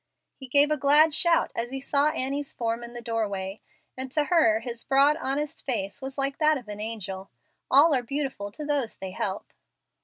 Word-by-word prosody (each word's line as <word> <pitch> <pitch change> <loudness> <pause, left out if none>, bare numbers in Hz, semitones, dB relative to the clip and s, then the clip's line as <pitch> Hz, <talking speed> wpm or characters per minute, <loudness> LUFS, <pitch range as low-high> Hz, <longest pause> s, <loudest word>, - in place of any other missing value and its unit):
He 265 - -10
gave 285 +3 +5
a 305 - +2
glad 295 +3 +5
shout 335 +2 +2
as 235 +1 -2
he 270 +1 -5
saw 280 +2 +2
Annie's 280 -1 -2
form 230 0 -2
in 235 0 -9
the 240 - -7
doorway, 205 -4 -3 0.4
and 260 0 -6
to 300 - +2
her 290 -10 +3
his 235 0 -6
broad, 275 +2 +4
honest 290 0 -3
face 220 -2 -2
was 265 +1 -6
like 275 0 -1
that 305 -1 +4
of 245 -5 -11
an 210 0 -7
angel. 195 -3 -5 0.4
All 290 +4 +6
are 260 - +2
beautiful 265 -5 -4
to 300 - -6
those 285 -6 -1
they 190 -1 -7
help. 190 +1 -4
265 Hz, 195 wpm, -26 LUFS, 225-290 Hz, 0.4 s, All